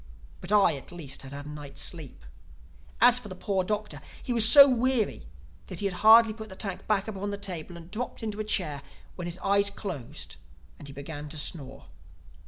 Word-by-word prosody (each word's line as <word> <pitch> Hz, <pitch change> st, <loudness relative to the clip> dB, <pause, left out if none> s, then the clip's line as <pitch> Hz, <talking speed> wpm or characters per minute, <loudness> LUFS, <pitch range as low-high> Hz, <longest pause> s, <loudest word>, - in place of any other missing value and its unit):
But 180 Hz, -, -8 dB
I, 200 Hz, -7 st, +5 dB
at 135 Hz, -, -12 dB
least, 150 Hz, -6 st, -7 dB
had 135 Hz, -, -10 dB
had 140 Hz, +1 st, -8 dB
a -, -, -8 dB
night's 145 Hz, -2 st, -8 dB
sleep. 145 Hz, -, -4 dB, 0.7 s
As 245 Hz, +2 st, +6 dB
for 235 Hz, -, -10 dB
the 185 Hz, -, -7 dB
poor 190 Hz, 0 st, -1 dB
Doctor, 210 Hz, -6 st, -4 dB, 0.2 s
he 245 Hz, -, -2 dB
was 225 Hz, -2 st, +6 dB
so 280 Hz, +4 st, +10 dB
weary 245 Hz, -, 0 dB, 0.4 s
that -, -, -7 dB
he 205 Hz, -, -2 dB
had 195 Hz, -, 0 dB
hardly 225 Hz, 0 st, +7 dB
put 220 Hz, 0 st, -9 dB
the 190 Hz, -, -10 dB
tank 195 Hz, -2 st, -5 dB
back 210 Hz, -1 st, +1 dB
upon 205 Hz, -1 st, -4 dB
the 200 Hz, -, -4 dB
table 180 Hz, -3 st, -6 dB
and 170 Hz, +1 st, -13 dB
dropped 230 Hz, +1 st, -5 dB
into 215 Hz, -1 st, -4 dB
a -, -, -1 dB
chair, 170 Hz, -9 st, -1 dB, 0.3 s
when 175 Hz, -1 st, -6 dB
his 175 Hz, +1 st, -5 dB
eyes 200 Hz, 0 st, +3 dB
closed 180 Hz, -, -7 dB, 0.4 s
and 145 Hz, -, -10 dB
he -, -, -7 dB
began 145 Hz, +1 st, -7 dB
to 155 Hz, -, -7 dB
snore. 140 Hz, -3 st, -3 dB
190 Hz, 205 wpm, -27 LUFS, 150-215 Hz, 0.7 s, so